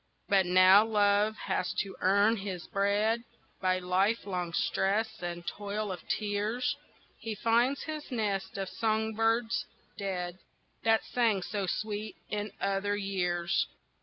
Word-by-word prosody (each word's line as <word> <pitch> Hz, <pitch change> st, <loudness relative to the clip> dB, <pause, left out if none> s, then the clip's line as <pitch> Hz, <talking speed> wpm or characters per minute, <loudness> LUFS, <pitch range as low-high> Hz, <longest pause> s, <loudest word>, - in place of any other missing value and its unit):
But 195 Hz, -2 st, +3 dB
now 185 Hz, +3 st, +7 dB
Love 210 Hz, -1 st, +3 dB
has 190 Hz, -2 st, -2 dB
to 195 Hz, -, -9 dB
earn 200 Hz, +4 st, +4 dB
his 190 Hz, -3 st, -5 dB
bread 210 Hz, +4 st, +1 dB, 0.4 s
By 185 Hz, -1 st, +2 dB
lifelong 185 Hz, -1 st, 0 dB
stress 200 Hz, +5 st, 0 dB
and 175 Hz, -1 st, -5 dB
toil 205 Hz, +2 st, -3 dB
of 180 Hz, -, -6 dB
tears, 215 Hz, +7 st, -1 dB, 0.4 s
He 225 Hz, -1 st, -4 dB
finds 235 Hz, +6 st, +2 dB
his 310 Hz, -1 st, -6 dB
nest 205 Hz, -6 st, -2 dB
of 195 Hz, -1 st, -2 dB
song 220 Hz, +2 st, 0 dB
birds 225 Hz, +1 st, +1 dB, 0.3 s
dead 185 Hz, -2 st, -3 dB, 0.4 s
That 225 Hz, 0 st, +3 dB
sang 225 Hz, -6 st, +1 dB
so 200 Hz, -1 st, -3 dB
sweet 215 Hz, +2 st, -3 dB, 0.2 s
in 210 Hz, 0 st, -2 dB
other 200 Hz, +1 st, 0 dB
years. 180 Hz, -4 st, 0 dB
205 Hz, 130 wpm, -30 LUFS, 190-220 Hz, 0.4 s, now